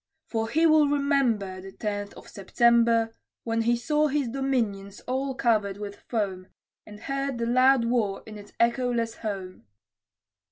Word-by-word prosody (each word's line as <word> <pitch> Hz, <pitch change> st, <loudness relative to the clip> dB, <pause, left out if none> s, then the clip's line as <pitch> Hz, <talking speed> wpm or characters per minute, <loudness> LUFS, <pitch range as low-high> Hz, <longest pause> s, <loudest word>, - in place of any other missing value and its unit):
For 225 Hz, -1 st, -2 dB
he 320 Hz, +7 st, +2 dB
will 310 Hz, -2 st, +5 dB
remember, 265 Hz, -10 st, 0 dB
The 190 Hz, 0 st, -11 dB
Tenth 205 Hz, -1 st, -4 dB
of -, -, -13 dB
September, 230 Hz, +2 st, +2 dB, 0.3 s
When 230 Hz, 0 st, 0 dB
he 235 Hz, +1 st, +2 dB
saw 300 Hz, +4 st, +1 dB
his 280 Hz, -3 st, -1 dB
dominions 225 Hz, -7 st, -2 dB
all 265 Hz, +1 st, -2 dB
covered 215 Hz, -6 st, +1 dB
with 205 Hz, -1 st, -7 dB
foam, 195 Hz, -5 st, -2 dB, 0.4 s
And 210 Hz, 0 st, -12 dB
heard 275 Hz, -1 st, -3 dB
the 235 Hz, -, -1 dB
loud 255 Hz, +1 st, +4 dB
war 225 Hz, -5 st, 0 dB
in 220 Hz, -, -10 dB
its 205 Hz, -, -13 dB
echoless 235 Hz, -1 st, +1 dB
home. 190 Hz, -, -6 dB
230 Hz, 150 wpm, -26 LUFS, 205-265 Hz, 0.4 s, will